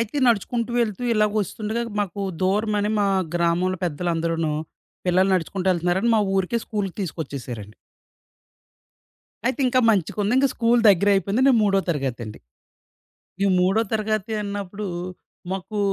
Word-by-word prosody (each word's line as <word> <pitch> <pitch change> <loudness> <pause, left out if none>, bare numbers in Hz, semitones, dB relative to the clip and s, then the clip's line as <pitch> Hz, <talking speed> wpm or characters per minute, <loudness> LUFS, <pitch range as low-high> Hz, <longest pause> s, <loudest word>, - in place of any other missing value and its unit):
అయితే 230 +4 -3
నడుచుకుంటూ 235 +1 +1
వెళ్తూ 220 -1 -1
ఇలాగొస్తుండగా 215 +1 0 0.2
మాకు 200 -1 -3 0.2
దూరమని 210 +2 +1
మా 200 - +2 0.3
గ్రామంలో 175 +2 +1
పెద్దలందరూను, 165 -1 -1 0.5
పిల్లలు 185 +2 +3
నడుచుకుంటూ 185 +2 -1
ఎళ్తున్నారని 180 +6 +1
మా - - +3 0.2
ఊరికే 190 +5 0
స్కూలు 205 -3 -2
తీసుకొచ్చేసారండి. 130 - -6 1.7
అయితే 260 +3 0
ఇంకా 255 0 +3
మంచిగుంది 205 +3 0
ఇంక 275 - +4
స్కూలు 235 0 +3
దగ్గరైపోయింది. 200 +3 +2
నేను 260 -4 +5
మూడో 195 -1 +3
తరగతండి. 125 -8 -3 1.1
ఈ - - +4
మూడో 190 +4 +3
తరగతి 215 -1 -1
అన్నప్పుడు 200 0 -5 0.7
మాకు 195 +3 -4
200 Hz, 115 wpm, -23 LUFS, 175-215 Hz, 1.7 s, నేను